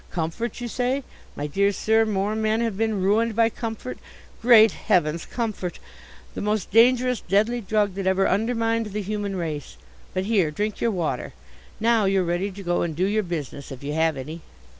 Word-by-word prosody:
Comfort, 175 Hz, +9 st, -3 dB
you 245 Hz, -, -4 dB
say? 255 Hz, +4 st, -1 dB, 0.3 s
My 145 Hz, -, -3 dB
dear 200 Hz, +7 st, +2 dB
sir! 220 Hz, +3 st, +2 dB
more 205 Hz, 0 st, 0 dB
men 220 Hz, 0 st, +1 dB
have 230 Hz, -4 st, -1 dB
been 215 Hz, -2 st, 0 dB
ruined 220 Hz, +3 st, +2 dB
by 230 Hz, 0 st, +4 dB
comfort 230 Hz, +2 st, -6 dB, 0.4 s
Great 225 Hz, -3 st, +7 dB
heavens, 165 Hz, -2 st, 0 dB
comfort! 215 Hz, -7 st, -3 dB, 0.6 s
The -, -, -5 dB
most 210 Hz, -2 st, -1 dB
dangerous, 250 Hz, +1 st, +4 dB
deadly 220 Hz, +5 st, +1 dB
drug 205 Hz, -1 st, +1 dB
that 195 Hz, 0 st, -3 dB
ever 190 Hz, +1 st, +3 dB
undermined 225 Hz, +2 st, 0 dB
the 210 Hz, -, -2 dB
human 205 Hz, 0 st, -3 dB
race. 155 Hz, -5 st, -4 dB, 0.4 s
But, 185 Hz, 0 st, 0 dB
here, 200 Hz, -7 st, +2 dB
drink 210 Hz, +7 st, -3 dB
your 235 Hz, -, +2 dB
water. 165 Hz, -, -2 dB, 0.5 s
Now 225 Hz, -1 st, +3 dB
you're 195 Hz, -1 st, +2 dB
ready 175 Hz, +3 st, -1 dB
to 200 Hz, +1 st, -9 dB
go 175 Hz, -1 st, 0 dB
and 165 Hz, -3 st, -2 dB
do 180 Hz, +4 st, +1 dB
your 210 Hz, +2 st, +1 dB
business, 150 Hz, -, -5 dB
if 135 Hz, 0 st, -9 dB
you 145 Hz, +1 st, -3 dB
have 160 Hz, -1 st, +1 dB
any." 155 Hz, +6 st, -7 dB
205 Hz, 185 wpm, -24 LUFS, 175-225 Hz, 0.6 s, Great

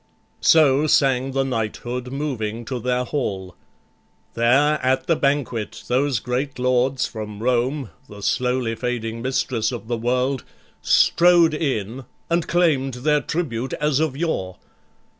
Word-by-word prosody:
So 150 Hz, -2 st, +4 dB
sang 135 Hz, -2 st, +2 dB
the 135 Hz, 0 st, +1 dB
knighthood, 125 Hz, +1 st, -3 dB
moving 120 Hz, -6 st, -3 dB
to 125 Hz, +1 st, -4 dB
their 125 Hz, +1 st, 0 dB
hall. 95 Hz, -, -4 dB, 0.8 s
There 135 Hz, +6 st, +3 dB
at 130 Hz, +1 st, +1 dB
the 165 Hz, -, +2 dB
banquet 140 Hz, -7 st, -1 dB
those 130 Hz, +1 st, +1 dB
great 125 Hz, +4 st, -3 dB
Lords 125 Hz, +1 st, +1 dB
from 105 Hz, -2 st, -7 dB
Rome, 125 Hz, +1 st, 0 dB, 0.2 s
The 105 Hz, -1 st, -11 dB
slowly 125 Hz, -1 st, 0 dB
fading 115 Hz, -1 st, -3 dB
mistress 125 Hz, -3 st, -1 dB
of 115 Hz, -4 st, -7 dB
the 120 Hz, 0 st, -1 dB
world, 125 Hz, +3 st, 0 dB, 0.4 s
Strode 170 Hz, -2 st, +4 dB
in, 130 Hz, -, -2 dB, 0.3 s
and 170 Hz, -1 st, +1 dB
claim'd 145 Hz, -7 st, +1 dB
their 150 Hz, -1 st, +3 dB
tribute 135 Hz, -7 st, -3 dB
as 150 Hz, -2 st, 0 dB
of 155 Hz, -4 st, -1 dB
yore. 95 Hz, -, -2 dB
130 Hz, 130 wpm, -22 LUFS, 120-140 Hz, 0.8 s, So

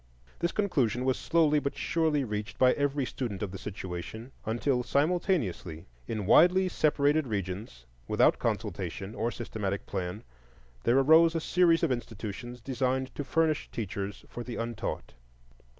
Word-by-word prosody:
This 170 Hz, +1 st, 0 dB
conclusion 130 Hz, -, 0 dB
was 130 Hz, -1 st, +2 dB
slowly 155 Hz, -3 st, +3 dB
but 140 Hz, -1 st, -3 dB
surely 160 Hz, -3 st, +1 dB
reached 105 Hz, -3 st, -4 dB
by 130 Hz, -1 st, +5 dB
every 145 Hz, -1 st, 0 dB
student 115 Hz, -6 st, -4 dB
of 100 Hz, -, -3 dB
the 95 Hz, -, -7 dB
situation 100 Hz, +4 st, -6 dB, 0.2 s
until 125 Hz, +3 st, +1 dB
simultaneously, 140 Hz, -, 0 dB, 0.2 s
in 105 Hz, -3 st, -3 dB
widely 180 Hz, -, +5 dB
separated 150 Hz, -2 st, +2 dB
regions, 95 Hz, -, -4 dB, 0.2 s
without -, -, +3 dB
consultation 100 Hz, +2 st, -3 dB
or 115 Hz, +2 st, -1 dB
systematic 105 Hz, -5 st, -4 dB
plan, 95 Hz, +2 st, -4 dB, 0.6 s
there 120 Hz, +3 st, +4 dB
arose 160 Hz, +4 st, +6 dB
a -, -, +2 dB
series 170 Hz, 0 st, +3 dB
of 160 Hz, -, +2 dB
institutions 120 Hz, 0 st, -5 dB
designed 130 Hz, +1 st, -1 dB
to 145 Hz, -, -4 dB
furnish 155 Hz, +1 st, +1 dB
teachers 100 Hz, -2 st, -5 dB
for 120 Hz, -, -7 dB
the 120 Hz, -1 st, -6 dB
untaught. 115 Hz, -1 st, -4 dB
125 Hz, 140 wpm, -29 LUFS, 105-150 Hz, 0.6 s, arose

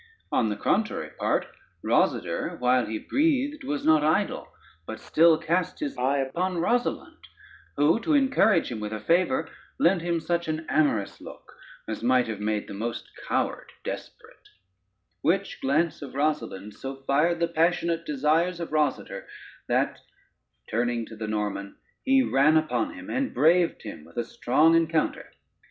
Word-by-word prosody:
On 110 Hz, -, +2 dB
the 105 Hz, -, -2 dB
contrary -, -, -1 dB
part, -, -, +1 dB, 0.4 s
Rosader -, -, 0 dB
while 125 Hz, 0 st, +2 dB
he 110 Hz, -, -3 dB
breathed 290 Hz, -, 0 dB
was 145 Hz, -1 st, -3 dB
not 155 Hz, -1 st, +5 dB
idle, 155 Hz, +1 st, 0 dB, 0.4 s
but 110 Hz, -, -6 dB
still 165 Hz, 0 st, +4 dB
cast 170 Hz, +3 st, -1 dB
his 295 Hz, -3 st, -3 dB
eye 135 Hz, +3 st, +1 dB
upon 170 Hz, +7 st, -1 dB
Rosalynde, 240 Hz, +9 st, -1 dB, 0.5 s
who 150 Hz, +9 st, +4 dB
to 300 Hz, +6 st, +1 dB
encourage 265 Hz, -, +3 dB
him 115 Hz, -, -4 dB
with 105 Hz, 0 st, -4 dB
a 110 Hz, -, -4 dB
favor, 165 Hz, -, +1 dB, 0.3 s
lent 175 Hz, 0 st, +3 dB
him 170 Hz, 0 st, 0 dB
such 170 Hz, +1 st, -1 dB
an 155 Hz, 0 st, -3 dB
amorous 130 Hz, -10 st, 0 dB
look, -, -, -12 dB, 0.3 s
as 110 Hz, -, -4 dB
might 125 Hz, +1 st, +3 dB
have 110 Hz, -2 st, -4 dB
made 105 Hz, 0 st, -2 dB
the -, -, -8 dB
most 115 Hz, +4 st, -5 dB, 0.2 s
coward -, -, -1 dB
desperate: -, -, -9 dB, 0.7 s
which -, -, 0 dB
glance 155 Hz, +6 st, +1 dB
of 135 Hz, -2 st, -8 dB
Rosalynde 140 Hz, -9 st, -2 dB
so 135 Hz, +5 st, -6 dB
fired 155 Hz, +5 st, +2 dB
the 170 Hz, -, +2 dB
passionate 170 Hz, 0 st, +1 dB
desires 160 Hz, +4 st, +1 dB
of 170 Hz, -, -5 dB
Rosader, 150 Hz, -1 st, -1 dB, 0.4 s
that -, -, 0 dB, 0.7 s
turning 120 Hz, 0 st, -1 dB
to 110 Hz, -, -11 dB
the 110 Hz, 0 st, -5 dB
Norman 105 Hz, -2 st, -3 dB, 0.3 s
he 265 Hz, 0 st, +4 dB
ran 155 Hz, -, +4 dB
upon 155 Hz, -, -1 dB
him 275 Hz, +1 st, -9 dB
and 265 Hz, 0 st, -2 dB
braved 170 Hz, +3 st, +3 dB
him 100 Hz, -8 st, -8 dB
with 85 Hz, -, -18 dB
a 120 Hz, -, +1 dB
strong 150 Hz, +7 st, +2 dB
encounter. 165 Hz, -1 st, +1 dB
155 Hz, 155 wpm, -26 LUFS, 120-170 Hz, 0.7 s, not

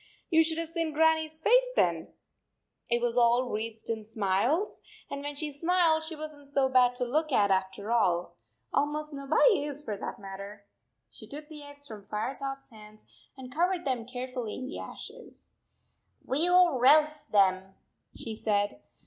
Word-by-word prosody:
You 325 Hz, 0 st, +6 dB
should 320 Hz, 0 st, -1 dB
have 330 Hz, 0 st, -2 dB
seen 330 Hz, -2 st, -2 dB
Grannie 320 Hz, +1 st, +3 dB
s 315 Hz, +1 st, -8 dB
face -, -, +4 dB
then! -, -, +1 dB, 0.8 s
It 235 Hz, 0 st, +1 dB
was 240 Hz, 0 st, +2 dB
all 240 Hz, +1 st, +4 dB
wreathed 220 Hz, +1 st, -5 dB
in 225 Hz, -1 st, -3 dB
smiles, 220 Hz, -, 0 dB, 0.3 s
and 280 Hz, -, -4 dB
when 290 Hz, 0 st, -5 dB
she 300 Hz, +1 st, -4 dB
smiled 330 Hz, +1 st, +2 dB
she 320 Hz, +1 st, -6 dB
wasn 305 Hz, -1 st, -8 dB
t 285 Hz, -, -17 dB
so 275 Hz, -1 st, +2 dB
bad 250 Hz, -1 st, +4 dB
to 250 Hz, -, -2 dB
look 305 Hz, +5 st, 0 dB
at 205 Hz, -5 st, +3 dB
after 190 Hz, +3 st, -1 dB
all. 180 Hz, -7 st, +1 dB, 0.4 s
Almost 300 Hz, +1 st, -1 dB
nobody 285 Hz, -, +3 dB
is 290 Hz, 0 st, -5 dB
for 215 Hz, -, -3 dB
that -, -, -6 dB
mat 195 Hz, -1 st, -9 dB
ter. 200 Hz, +1 st, -9 dB, 0.5 s
She -, -, -10 dB
took 295 Hz, +2 st, -9 dB
the 305 Hz, -2 st, -9 dB
eggs 285 Hz, 0 st, -11 dB
from 210 Hz, -6 st, -11 dB
Firetop 270 Hz, +5 st, -3 dB
s 275 Hz, -, -24 dB
hands 215 Hz, -1 st, -14 dB, 0.3 s
and 255 Hz, -1 st, -10 dB
covered 350 Hz, +2 st, 0 dB
them 250 Hz, -4 st, -1 dB
carefully 250 Hz, -3 st, -5 dB
in 255 Hz, -, -6 dB
the 265 Hz, -, -6 dB
ashes. 470 Hz, +2 st, -10 dB, 0.4 s
" -, -, -38 dB
We 295 Hz, +6 st, +2 dB
11 355 Hz, -6 st, +5 dB
roast 300 Hz, +3 st, +4 dB
them," 190 Hz, -1 st, +2 dB, 0.4 s
she 225 Hz, -2 st, -5 dB
said. 205 Hz, -, 0 dB
275 Hz, 180 wpm, -29 LUFS, 220-310 Hz, 0.8 s, You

